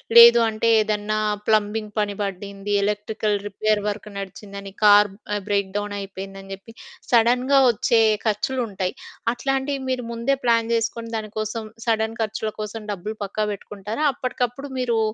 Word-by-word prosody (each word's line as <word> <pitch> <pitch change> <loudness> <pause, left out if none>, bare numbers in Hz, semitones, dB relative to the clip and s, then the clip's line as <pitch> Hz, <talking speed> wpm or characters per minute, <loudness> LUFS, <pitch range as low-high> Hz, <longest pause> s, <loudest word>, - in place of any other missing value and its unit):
లేదు 235 0 +10
అంటే 220 +1 -1
ఏదన్నా 215 0 0 0.3
ప్లంబింగ్ 215 0 +1
పని 205 -1 0
బడ్డింది, 200 +1 -4
ఎలక్ట్రికల్ 210 0 -1
రిపేర్ 210 +1 0
వర్క్ 210 +1 -4
నడిచిందని, 195 0 -8
కారు 205 -1 +7 0.2
ఆహ్, 205 - -2
బ్రేక్ 200 -2 +1
డౌనయిపోయిందని 195 -1 -6
జెప్పి, 200 +4 -11 0.4
సడన్‌గా 250 +4 +4
ఒచ్చే 230 +1 +2 0.2
ఖర్చులుంటాయి. 210 -3 -1 0.4
అట్లాంటియి 270 +2 -1
మీరు 250 -2 -2
ముందే 235 +4 0
ప్లాన్ 230 -1 +3
చేసుకొని, 230 0 -2
దాని 215 -1 -6
కోసం, 215 0 -4
సడన్ 225 0 0
ఖర్చుల 220 0 -2
కోసం 215 +1 -5
డబ్బులు 210 +3 -5
పక్కకు 210 +2 -2
పెట్టుకుంటారా, 210 +7 -4
అప్పటికప్పుడు 255 +2 -3
మీరూ 235 -3 +1
215 Hz, 130 wpm, -23 LUFS, 205-230 Hz, 0.4 s, లేదు